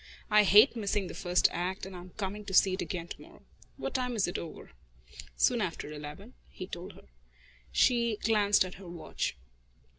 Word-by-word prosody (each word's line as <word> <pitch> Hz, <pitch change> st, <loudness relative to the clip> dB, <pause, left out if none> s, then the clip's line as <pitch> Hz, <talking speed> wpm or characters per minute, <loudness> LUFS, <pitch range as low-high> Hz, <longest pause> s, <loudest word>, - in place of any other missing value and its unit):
I 210 Hz, 0 st, +7 dB
hate 210 Hz, +7 st, +7 dB
missing 205 Hz, -3 st, -1 dB
the -, -, -7 dB
first 180 Hz, 0 st, +2 dB
act, 185 Hz, +3 st, -3 dB
and 190 Hz, -1 st, -9 dB
I'm 180 Hz, +1 st, -9 dB
coming 205 Hz, +1 st, -4 dB
to 190 Hz, -2 st, -3 dB
see 190 Hz, 0 st, +6 dB
it 185 Hz, -, -2 dB
again 170 Hz, 0 st, -4 dB
to -, -, -8 dB
morrow. -, -, -16 dB, 0.3 s
What -, -, -4 dB
time 250 Hz, -2 st, -1 dB
is 210 Hz, -, +1 dB
it 175 Hz, -, -3 dB
over?" 165 Hz, -, -9 dB, 0.7 s
"Soon -, -, +3 dB
after 150 Hz, -, -3 dB
eleven," 150 Hz, +10 st, -9 dB, 0.2 s
he 185 Hz, -, -7 dB
told 185 Hz, +2 st, -8 dB
her. -, -, -17 dB, 0.7 s
She 235 Hz, -3 st, +3 dB
glanced 205 Hz, -3 st, +4 dB
at 185 Hz, -, -7 dB
her 185 Hz, -, -10 dB
watch. 170 Hz, -, -4 dB
190 Hz, 185 wpm, -30 LUFS, 175-210 Hz, 0.7 s, I